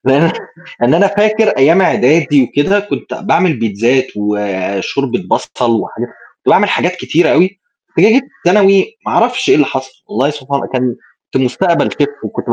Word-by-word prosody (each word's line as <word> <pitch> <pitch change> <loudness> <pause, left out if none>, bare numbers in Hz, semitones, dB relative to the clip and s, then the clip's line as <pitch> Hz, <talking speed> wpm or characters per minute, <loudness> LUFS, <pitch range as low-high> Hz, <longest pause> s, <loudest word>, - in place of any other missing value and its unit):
لإن 145 +5 +3 0.5
إن 125 +6 +3
أنا 200 +4 +4
فاكر 215 +2 +1
أيام 165 +8 +3
عدادي 145 -1 +3
وكده، 145 +11 +1
كنت 205 - -6
باعمل 185 -5 0
بيتزات، 115 +4 0
وشوربة 105 - -2
بصل، 115 -3 0
وحاجا 120 - -6
كنت - - -12
باعمل - - +4
حاجات 180 +1 0
كتيرة 175 -1 +1
أوي، 185 +2 +2 0.4
جِيت 235 +5 +5
في 265 - -21 0.2
ثانوي 195 - +3
ما - - -2
عرفش 245 +3 +1
إيه - - +6
اللي 145 -2 +3
حصل، 130 0 -5 0.2
والله 130 +6 0
سبحان 140 -1 -4
كان 125 -2 -1 0.4
كنت 130 - +1
مستقبل 170 +7 0
Chef 425 -1 -3
وكنت - - -6
ب - - +3
145 Hz, 165 wpm, -14 LUFS, 125-195 Hz, 0.5 s, إيه